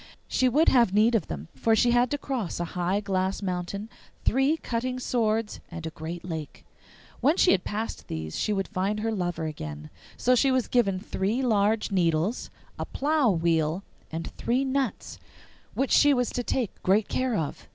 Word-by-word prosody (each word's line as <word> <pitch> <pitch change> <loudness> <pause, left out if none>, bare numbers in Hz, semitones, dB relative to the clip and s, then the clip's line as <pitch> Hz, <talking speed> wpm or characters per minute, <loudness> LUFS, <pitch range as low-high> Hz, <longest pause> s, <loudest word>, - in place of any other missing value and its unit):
She 255 - +2
would 300 +6 +3
have 235 -7 +4
need 220 +3 +5
of 210 -9 +1
them, 75 0 -6
for 225 +12 +2
she 240 +2 +3
had 245 +1 +3
to 290 - -1
cross 255 - -3
a 175 - -1
high 180 +3 0
glass 190 0 -1
mountain, 185 +3 -3 0.4
three 270 +6 +3
cutting 255 -2 -3
swords, 225 -3 0
and 165 -2 -7
a 160 - -4
great 165 +3 -7
lake. 160 -4 -6 0.5
When 295 +8 +3
she 360 - +5
had 180 - +2
passed 220 +2 -4
these 80 -1 -5
she - - 0
would 195 -2 0
find 205 +1 -1
her 225 +1 0
lover 175 -5 -2
again. 75 - -6 0.3
So 250 - +3
she 270 +2 +4
was 260 -2 +1
given 195 -7 +2
three 205 +7 -1
large 215 -2 +2
needles, 175 +3 +1 0.3
a - - -2
plough 290 -2 +1
wheel, 165 -1 +1 0.3
and 165 +1 -4
three 255 +3 +1
nuts, 270 0 -2 0.6
which 270 - 0
she 290 -1 +6
was 245 -1 0
to 245 - -2
take 245 -3 -2
great 200 +3 +3
care 255 -2 0
of. 155 -6 -3
210 Hz, 185 wpm, -27 LUFS, 175-250 Hz, 0.6 s, she